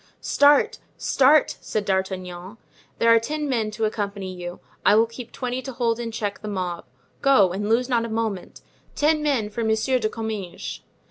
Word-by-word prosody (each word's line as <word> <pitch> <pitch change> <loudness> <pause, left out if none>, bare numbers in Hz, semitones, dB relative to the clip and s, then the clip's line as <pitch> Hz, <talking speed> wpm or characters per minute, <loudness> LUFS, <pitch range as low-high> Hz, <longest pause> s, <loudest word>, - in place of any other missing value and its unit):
"Start, 285 0 +4 0.2
start!" 280 +2 +4
said 210 -1 -2
D'Artagnan. 190 0 -3 0.4
"There 230 0 +5
are 230 - +6
ten 300 +6 -3
men 230 -5 0
to 220 +1 -2
accompany 200 -3 -3
you. 175 -1 -7 0.2
I 205 - +5
will 225 +1 +5
keep 230 +1 -10
twenty 250 0 -3
to 265 0 -7
hold 235 -1 0
in 235 -1 -3
check 215 -3 -3
the 215 - -6
mob; 180 -4 -3 0.4
go, 240 -10 +5
and 205 +2 -2
lose 240 +2 +2
not 240 -3 +1
a 230 - -4
moment. 220 -4 -3 0.3
Ten 305 +1 +2
men 260 -8 0
for 230 +2 -3
Monsieur 220 +4 +1
de 215 -2 0
Comminges." 215 -5 -5
225 Hz, 180 wpm, -24 LUFS, 200-250 Hz, 0.4 s, are